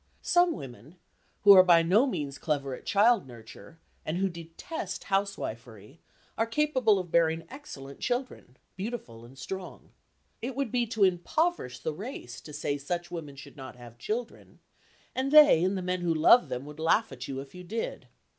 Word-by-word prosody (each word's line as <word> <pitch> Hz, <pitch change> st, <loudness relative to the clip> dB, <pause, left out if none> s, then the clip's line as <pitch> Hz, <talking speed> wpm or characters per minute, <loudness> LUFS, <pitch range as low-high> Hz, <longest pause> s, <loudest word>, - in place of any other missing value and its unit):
Some 350 Hz, -1 st, +3 dB
women 130 Hz, -, -10 dB, 0.5 s
who 205 Hz, -, +9 dB
are 190 Hz, -2 st, +10 dB
by 175 Hz, -2 st, +5 dB
no 205 Hz, +11 st, +4 dB
means 145 Hz, -, -4 dB
clever 140 Hz, -4 st, -2 dB
at -, -, -10 dB
child 215 Hz, -, +3 dB
nurture, 120 Hz, +7 st, -13 dB, 0.3 s
and 155 Hz, +3 st, -3 dB
who 195 Hz, +1 st, +1 dB
detest 170 Hz, -, -7 dB
housewifery, 130 Hz, -, -4 dB, 0.4 s
are 225 Hz, -, +2 dB
capable 255 Hz, -4 st, +2 dB
of 180 Hz, -3 st, -5 dB
bearing 165 Hz, -1 st, +2 dB
excellent 140 Hz, -, -10 dB
children, 245 Hz, -, -4 dB, 0.2 s
beautiful 190 Hz, -, -6 dB
and 130 Hz, +3 st, -16 dB
strong. 185 Hz, +7 st, -8 dB, 0.5 s
It 245 Hz, +2 st, -4 dB
would 270 Hz, -5 st, -2 dB
be 240 Hz, -1 st, +1 dB
to 220 Hz, -2 st, 0 dB
impoverish 185 Hz, -, 0 dB
the 160 Hz, -, -2 dB
race 170 Hz, -, -8 dB
to 150 Hz, -, -11 dB
say 145 Hz, 0 st, -3 dB
such 175 Hz, +4 st, -4 dB
women 155 Hz, -5 st, -7 dB
should 135 Hz, -, -12 dB
not 130 Hz, -2 st, -9 dB
have 120 Hz, -1 st, -14 dB
children 230 Hz, -, -5 dB, 0.6 s
(and 265 Hz, +1 st, -1 dB
they 295 Hz, -, +8 dB
and 190 Hz, +2 st, +1 dB
the 185 Hz, -, -4 dB
men 180 Hz, 0 st, -2 dB
who 170 Hz, -2 st, 0 dB
love 200 Hz, +10 st, +6 dB
them 125 Hz, +2 st, -4 dB
would 150 Hz, +1 st, -11 dB
laugh 165 Hz, +6 st, +2 dB
at 125 Hz, -1 st, -8 dB
you 135 Hz, -1 st, -4 dB
if 135 Hz, 0 st, -10 dB
you 180 Hz, 0 st, -10 dB
did). 225 Hz, +6 st, -5 dB
175 Hz, 175 wpm, -28 LUFS, 140-225 Hz, 0.6 s, are